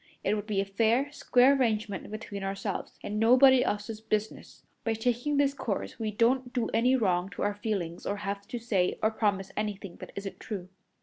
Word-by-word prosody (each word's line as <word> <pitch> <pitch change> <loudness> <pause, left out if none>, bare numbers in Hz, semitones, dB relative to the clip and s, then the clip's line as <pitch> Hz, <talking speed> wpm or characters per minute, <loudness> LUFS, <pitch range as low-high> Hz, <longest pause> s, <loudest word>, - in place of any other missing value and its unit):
It - - +2
would 210 0 -3
be 205 -3 0
a 195 - +1
fair, 230 +8 +1
square 265 -1 +4
arrangement 215 -6 -1
between 210 -2 -6
ourselves, 195 0 -4
and 210 +1 -3
nobody 255 +3 +7
else's 210 +1 -3
business. 215 -1 -3 0.2
By 225 - +1
taking 245 +6 0
this 280 -1 +3
course, 230 -2 -4
we 220 -1 -1
don't 245 +4 +2
do 245 -3 0
any 250 +3 +4
wrong 185 -6 +1
to - - -3
our 205 0 +1
feelings 195 -5 -3
or 200 - 0
have 200 0 -4
to 240 - -4
say 205 -6 0
or 220 - +4
promise 200 -3 0
anything 200 -3 -4
that - - -10
isn't 200 -1 -6
true." 190 -4 -6
215 Hz, 190 wpm, -29 LUFS, 200-240 Hz, 0.2 s, nobody